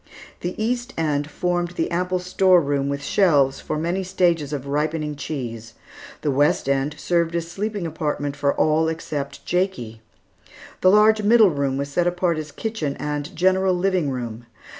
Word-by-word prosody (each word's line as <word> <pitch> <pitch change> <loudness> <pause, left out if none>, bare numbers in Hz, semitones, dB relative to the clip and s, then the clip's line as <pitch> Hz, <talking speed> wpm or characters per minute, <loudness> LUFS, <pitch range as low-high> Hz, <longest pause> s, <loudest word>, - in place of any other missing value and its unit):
The 175 +3 -5
east 245 +3 -2
end 150 -2 0
formed 175 +2 -1
the 165 - -1
ample 180 +1 0
store 185 0 +4
room 140 -2 -1
with 140 0 -3
shelves 140 -7 +3
for - - -4
many 170 +5 -1
stages 175 -5 +1
of 140 -3 -4
ripening 150 +1 -1
cheese. 115 -6 -6 0.5
The 145 - 0
west 145 +1 +2
end 140 +2 0
served 170 -1 0
as 170 0 -3
sleeping 205 0 -3
apartment 150 -3 -3
for 140 0 +1
all 155 +1 +2
except 150 -3 -4
Jakie. 180 - -2 0.8
The 185 - +6
large 215 +2 +5
middle 215 -2 +5
room 140 -2 -1
was 140 +1 -3
set 175 +4 +1
apart 175 -2 0
as 155 -1 -7
kitchen 190 -11 -3
and 150 +4 -4
general 185 +2 +2
living 180 -4 +1
room. 120 -3 -5
160 Hz, 160 wpm, -22 LUFS, 140-185 Hz, 0.8 s, The